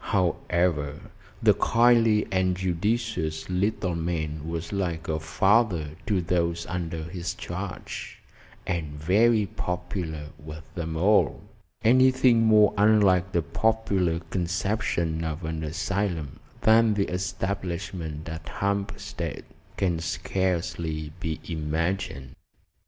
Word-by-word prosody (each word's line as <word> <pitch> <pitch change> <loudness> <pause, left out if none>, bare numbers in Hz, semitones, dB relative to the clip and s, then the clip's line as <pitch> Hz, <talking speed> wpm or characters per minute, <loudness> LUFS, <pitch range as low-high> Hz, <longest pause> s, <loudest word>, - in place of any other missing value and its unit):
However, 85 -5 +1 0.4
the - - +7
kindly 115 -2 +4
and 95 -1 +1
judicious 95 -2 -1
little 95 0 0
man 80 -2 -3
was 85 +2 -4
like 85 -4 -2
a 80 -1 -1
father 85 0 +2 0.2
to 100 -4 +2
those 85 -1 0
under 85 -3 -3
his 85 +1 -4
charge, 90 +1 -6 0.5
and 80 -4 -3
very 105 +7 +4
popular 90 -4 -4
with 75 +1 -9
them 80 -2 -4
all. 100 +6 +3 0.4
Anything 130 0 +5
more 105 -2 +6
unlike 100 -3 +4
the 85 -4 +1
popular 100 -6 +1
conception 85 -2 -1
of 80 +1 -4
an 80 0 -3
asylum 85 -1 -2 0.2
than 110 -1 +5
the 100 -1 +2
establishment 90 -3 -3
at 80 -1 -6
Hampstead 100 0 -3 0.3
can 90 -4 +1
scarcely 85 -2 -2
be 80 -2 -3
imagined. 80 -3 -2
90 Hz, 105 wpm, -26 LUFS, 80-100 Hz, 0.5 s, the